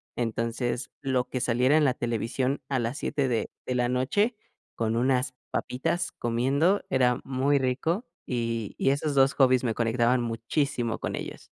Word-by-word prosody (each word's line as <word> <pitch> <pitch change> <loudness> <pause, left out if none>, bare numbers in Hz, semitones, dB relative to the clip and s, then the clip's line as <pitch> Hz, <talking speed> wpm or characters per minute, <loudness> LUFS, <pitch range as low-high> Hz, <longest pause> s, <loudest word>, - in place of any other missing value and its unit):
entonces 120 +1 -2
lo 130 -2 0
que 130 - -3
saliera 125 +4 +3
en 155 - +4
la 130 -2 +2
televisión 120 +4 -1
a 135 - +1
las 120 +5 -2
7 140 -2 0
de 120 -3 -1 0.2
de 125 - -1
la 120 0 +1
noche 205 - +1 0.4
con 115 -1 0
unas 125 +2 +1 0.2
papitas 170 +7 -1
comiendo 135 +11 +2
era 125 -2 +3
muy 135 +2 +1
rico, 140 - 0 0.2
y 115 -3 -2
y 135 - +3
esos 145 +1 -1
2 135 0 +5
hobbies 130 -2 +4
me 115 - +1
conectaban 120 +2 +2
muchísimo 115 +1 -1
con - - -3
ellos. - - -7
125 Hz, 160 wpm, -27 LUFS, 120-135 Hz, 0.4 s, 2